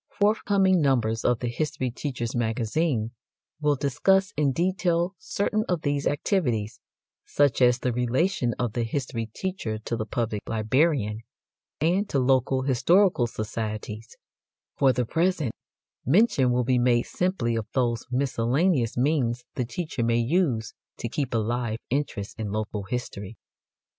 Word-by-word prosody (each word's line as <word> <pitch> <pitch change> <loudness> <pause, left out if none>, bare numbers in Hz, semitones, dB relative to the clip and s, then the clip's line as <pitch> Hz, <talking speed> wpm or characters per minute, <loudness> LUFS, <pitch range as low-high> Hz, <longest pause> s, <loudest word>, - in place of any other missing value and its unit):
Forthcoming 200 -3 +3
numbers 120 -5 +1
of 120 -2 +1
THE 125 - -1
HISTORY 130 0 -2
TEACHER'S 125 -3 -4
MAGAZINE 115 +2 0 0.5
will 150 -1 +2
discuss 190 +9 +2
in 145 -2 +2
detail 175 +2 0
certain 200 +3 -1
of 175 -3 0
these 145 -1 0
activities, 125 - 0 0.4
such 145 -3 +1
as 125 -1 +5
the 125 -1 -1
relation 125 +2 0
of 120 -4 -2
the 120 - -1
history 115 -1 -3
teacher 115 - -4
to 110 +2 -4
the 110 -1 -4
public 110 -2 -2
librarian, 115 0 +1 0.6
and 180 +7 +1
to - - 0
local 130 0 +2
historical 135 - +3
societies; 110 0 -5 0.6
for 135 -1 +4
the 125 0 0
present, 165 -1 0 0.5
mention 145 - +3
will 125 0 +2
be 125 0 +2
made 120 -1 +3
simply 180 -11 -1
of 110 -2 -3
those 120 -3 0
miscellaneous 130 +2 +1
means 125 -3 +1
the 125 - -2
teacher 155 0 -4
may 115 0 +2
use 120 -4 +1 0.2
to 120 - -4
keep 135 +1 -2
alive 115 0 -1
interest 120 -7 -3
in 105 -2 -3
local 105 -1 -3
history. 110 -3 -5
125 Hz, 140 wpm, -26 LUFS, 115-155 Hz, 0.6 s, as